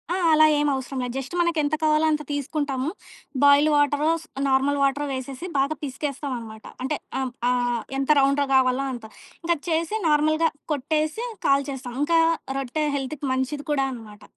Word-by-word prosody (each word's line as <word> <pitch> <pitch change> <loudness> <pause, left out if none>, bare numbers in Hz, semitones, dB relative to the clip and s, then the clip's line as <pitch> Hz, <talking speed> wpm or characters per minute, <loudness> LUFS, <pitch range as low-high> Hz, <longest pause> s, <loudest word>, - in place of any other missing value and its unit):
ఆ! - - -1 0.2
అలా 310 0 +7
ఏం 295 0 +2
అవసరం 265 0 -4
లేదు. 245 -1 -4
జస్ట్ 270 +4 -5
మనకెంత 315 -3 +1
కావాలో 310 0 +3
అంత 300 0 0
తీసుకుంటాము. 285 -1 -2 0.5
బాయిల్డ్ 285 +2 +6
వాటరో 290 +2 +2
స్ - - -18 0.2
నార్మల్ 275 +2 +2
వాటరో 280 +2 +1
వేసేసి 260 +5 -6
బాగా 280 +3 +1
పిసికేస్తామన్నమాట. 265 -5 -5 0.2
అంటే 285 +3 -1 0.2
అ - - -1 0.3
ఆహ్ 245 -2 0 0.2
ఎంత 275 +2 -2
రౌండ్‌గా 275 +1 +3
గావాలో 260 +1 +3
అంత. 235 -2 -8 0.4
ఇంకా 340 -1 +1
చేసి 330 +5 0
నార్మల్‌గా 310 +2 +3 0.2
కొట్టేసి 310 - -1 0.2
కాల్చేస్తాం. 275 -3 0
ఇంకా 330 +2 +3 0.4
రొట్టె 285 +4 -2
హెల్త్‌కి 280 +2 -5
మంచిది 260 +3 -2
కూడా 275 -2 +2
అనమాట. 215 -3 -12
285 Hz, 150 wpm, -24 LUFS, 260-305 Hz, 0.5 s, అలా